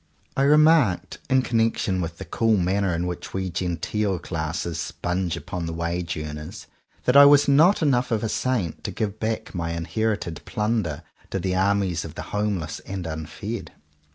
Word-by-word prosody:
I - - +1
remarked, 150 - +4
in 130 0 +4
connection 115 -5 +1
with 85 -1 -4
the 95 - -7
cool 110 +5 +2
manner 95 0 +1
in 85 +1 -1
which 90 +1 -5
we 95 -1 -2
genteel 95 +3 -1
classes 80 -1 -3
sponge 90 +2 -2
upon 85 0 -5
the 85 - -4
wage 85 0 -2
earners, 75 0 -7 0.4
that 125 - +3
I 140 0 +10
was 145 0 +6
not 160 +7 +5
enough 130 -4 +2
of 115 -3 0
a - - +1
saint 110 -7 -1
to - - -1
give 105 -1 -3
back 110 0 -3
my 85 -2 -2
inherited 95 0 -2
plunder 105 -8 -1 0.3
to - - -2
the 95 0 -1
armies 95 -2 +1
of 80 -1 -9
the - - -5
homeless 100 -6 -1
and 95 -2 -6
unfed. 80 +8 -5
95 Hz, 170 wpm, -24 LUFS, 85-115 Hz, 0.4 s, I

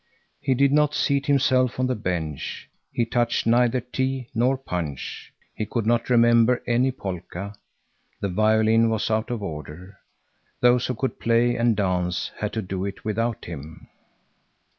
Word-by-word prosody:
He 130 - +1
did 140 +2 +3
not 150 0 +3
seat 140 -1 +1
himself 130 -3 +2
on 130 - +2
the 130 - 0
bench; 85 - -4 0.2
he 120 - 0
touched 120 0 0
neither 120 +2 +3
tea 130 0 -3
nor 125 +4 +2
punch; 85 - -5 0.2
he 110 - -4
could 115 -3 -2
not 115 +2 +1
remember 120 0 +4
any 125 +2 +2
polka; 95 -3 -6 0.7
the 100 - -2
violin 110 +3 +3
was 110 0 -1
out 110 +1 0
of 120 -4 -3
order. 85 +4 -8 0.6
Those 125 0 +4
who 125 - -2
could 130 +4 -3
play 120 +1 +2
and 115 -2 +2
dance 90 -3 -1
had 105 0 -2
to 110 - -2
do 95 0 -4
it 100 +1 -6
without 115 +2 -1
him. 80 0 -9
115 Hz, 155 wpm, -24 LUFS, 100-125 Hz, 0.7 s, remember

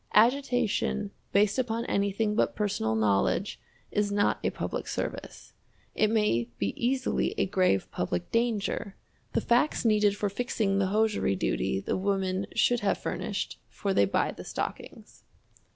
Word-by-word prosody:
Agitation 235 -4 +2 0.2
based 205 +4 +3
upon 235 -2 -1
anything 200 +2 0
but 210 - +1
personal 150 - 0
knowlledge 110 - +1 0.3
is 205 0 0
not 205 0 +2
a - - +2
public - - -4
service. - - -5 0.4
It 215 - +2
may 210 - +1
be 100 -1 -1
easily 255 +2 0
a - - +2
grave 185 - +2
public 90 -1 -3
danger. 225 -3 -1 0.4
The - - +1
facts 245 +3 +2
needed 210 -2 +3
for 205 - 0
fixing 200 -2 0
the 195 - +2
hosiery 210 - +1
duty 65 0 0
the - - -2
women 190 0 -1
should 245 0 +3
have 205 -2 +1
furnished, - - -4
for 200 -1 -2
they 100 - +4
buy 100 - 0
the - - -9
stockings. - - -6
205 Hz, 145 wpm, -28 LUFS, 190-225 Hz, 0.4 s, they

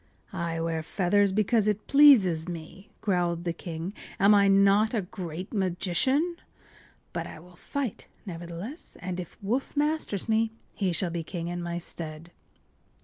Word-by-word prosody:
” - - -30
“I 170 -3 -2
wear 165 -1 -1
feathers 195 +4 +2
because 215 +2 +2
it 210 0 0
pleases 200 - +6
me,” 175 +3 -8
growled 175 -4 0
the 170 -1 -1
king. 170 +2 -6 0.3
“Am 200 +2 +6
I 200 -1 +5
not 200 +4 +4
a 210 - 0
great 180 0 -7
magician? 200 - +2 0.8
But - - -3
I - - -9
will 175 +2 -16
fight, 265 +4 -4 0.2
nevertheless, 175 - -7
and 180 0 -4
if 175 - -8
Woof 250 +8 -2
masters 295 - 0
me 225 0 +2 0.2
he 190 -3 0
shall 175 +1 +1
be 170 0 -2
king 170 +1 -5
in 175 0 -4
my 175 0 -3
stead. 165 -1 -6
185 Hz, 155 wpm, -28 LUFS, 170-215 Hz, 0.8 s, pleases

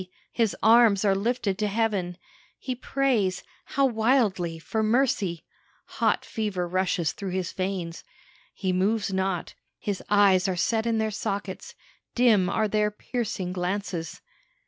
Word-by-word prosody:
his 225 -4 +1
arms 220 -2 +5
are 195 - +4
lifted 205 -1 -1
to 210 - +1
heaven 200 -5 -1 0.4
he 260 - -4
prays 250 -7 0 0.2
how 275 - +1
wildly! 220 -8 +1
for 220 +7 -3
mercy. 215 - +1 0.6
Hot - - +2
fever 205 -5 -2
rushes 180 -3 0
through 195 - -6
his 185 -1 -2
veins. 185 -3 -4 0.5
He 190 -2 -1
moves 195 +2 0
not; 190 -2 -1 0.2
his 200 -2 -3
eyes 200 -2 +4
are 190 - 0
set 220 +5 0
in 230 -1 +1
their 220 0 0
sockets; 200 -2 -4 0.4
dim 220 -7 +4
are 215 +2 +1
their 210 0 +1
piercing 210 -4 -4
glances. 180 -2 -3
200 Hz, 135 wpm, -26 LUFS, 185-225 Hz, 0.6 s, arms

